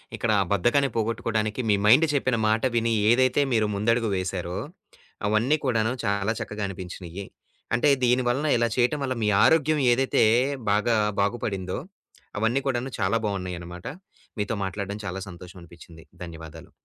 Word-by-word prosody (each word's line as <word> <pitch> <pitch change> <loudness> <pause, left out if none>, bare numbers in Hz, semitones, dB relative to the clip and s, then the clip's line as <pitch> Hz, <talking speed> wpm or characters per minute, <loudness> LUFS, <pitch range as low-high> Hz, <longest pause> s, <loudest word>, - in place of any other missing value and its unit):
ఇక్కడ 115 - -1
ఆ - - +2
బద్ధకాన్ని 120 +7 +2
పోగొట్టుకోవడానికి 110 0 -1
మీ 105 - +5
మైండ్ 130 +10 +6
చెప్పిన 130 -4 +1
మాట 110 +1 +1
విని 115 0 +1 0.2
ఏదైతే 130 +3 +3
మీరు 110 -2 +2
ముందడుగు 115 +2 +1
వేసారో 90 -1 -3 0.7
అవన్నీ 115 +9 +2
కూడాను 115 -3 +1
చాలా 100 +1 0
చక్కగా 105 0 -5
అనిపించినియ్యి. 90 0 -8 0.5
అంటే 135 +6 +3
దీని 125 +1 +3
వలన 140 +5 0
ఇలా 120 0 +2
చేయటం 125 +4 +2
వల్ల 130 -1 -1
మీ 105 - +2
ఆరోగ్యం 155 -1 +3
ఏదైతే 130 0 +2 0.5
బాగా 105 +3 +2 0.3
బాగుపడిందో 100 -3 -2 0.6
అవన్నీ 115 +5 +1
కూడాను 130 0 -2
చాలా 100 +4 +1
బావున్నయన్నమాట. 90 -2 -5 0.5
మీతో 105 +2 -1
మాట్లాడ్డం 100 +2 -5
చాలా 95 +2 -5
సంతోషమనిపిచ్చింది. 85 -2 -13 0.2
ధన్యవాదాలు. 80 -1 -10
110 Hz, 135 wpm, -25 LUFS, 95-120 Hz, 0.7 s, మైండ్